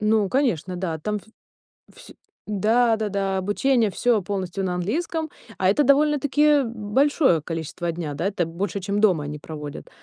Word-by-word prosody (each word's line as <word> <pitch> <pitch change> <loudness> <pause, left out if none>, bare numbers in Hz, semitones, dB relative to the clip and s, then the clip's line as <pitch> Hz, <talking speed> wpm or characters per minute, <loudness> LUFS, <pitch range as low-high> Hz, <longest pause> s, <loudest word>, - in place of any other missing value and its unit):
Ну, 210 -1 +2
конечно, 190 - 0
да! 170 -3 -3
Там 210 +7 -2
в 220 +3 -22 0.5
всь - - -13 0.3
да 225 +3 +2
да 215 -1 -2
да, 195 -1 -1
обучение 220 +3 +1
всё 235 +1 +2
полностью 190 0 -3
на 180 -1 -1
английском, 315 - -2 0.3
а 185 - +2
это 290 +8 +2
довольно-таки 295 +1 +3
большое 230 - +2
количество 165 +2 -4
дня, 160 -3 -5
да, 165 +7 -2
это 190 -4 0
больше, 185 +4 -3
чем 200 +2 -1
дома 180 -9 +3
они 150 +1 -5
проводят. 150 -1 -8
205 Hz, 160 wpm, -23 LUFS, 175-245 Hz, 0.5 s, довольно-таки